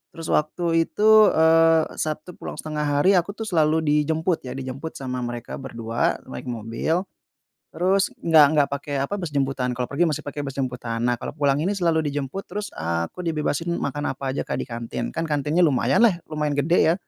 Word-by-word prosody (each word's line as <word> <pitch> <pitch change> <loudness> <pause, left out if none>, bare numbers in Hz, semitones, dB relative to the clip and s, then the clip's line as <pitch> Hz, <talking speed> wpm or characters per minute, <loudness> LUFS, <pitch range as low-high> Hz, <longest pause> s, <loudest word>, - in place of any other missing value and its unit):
terus 165 -1 -5
waktu 165 +2 +1
itu, 215 0 +6
eee, 160 0 +4
Sabtu 155 +3 -3
pulang - - -6
setengah 150 -1 -3
hari 160 +7 +4
aku 200 +4 -5
tuh 225 - -5
selalu 160 -5 +2
dijemput 155 +1 0
ya, - - -5
dijemput 135 +4 -6
sama 130 -2 -4
mereka 120 0 -5
berdua 115 -3 -2
naik 65 - -7
mobil. 120 - -2 0.7
Terus 190 +4 +1
enggak 160 -3 +6
enggak 145 -2 +3
pakai 140 +1 -4
apa 140 +9 -2
bus 175 -6 -5
jemputan, 135 -3 0
kalau 125 0 -3
pergi 150 +5 +1
masih 155 -4 0
pakai 145 0 -6
bus 135 - -4
jemputan. 125 -4 -3
Nah, 120 - +2
kalau - - -6
pulang 140 -2 +1
ini 170 +7 0
selalu 170 -5 +1
dijemput, 145 +5 -3
terus 210 0 -5
aku 85 - -3
dibebasin 165 +1 -1
makan 145 0 -2
apa 135 +1 -5
aja, 130 - -2
Kak, - - -3
di - - -5
kantin 115 -1 -4
kan 165 - -3
kantinnya 150 +3 +1
lumayan 140 - +3
lah, 190 -7 +3
lumayan 150 -1 -1
gede 160 +3 +3
ya, - - +1
150 Hz, 190 wpm, -23 LUFS, 135-165 Hz, 0.7 s, itu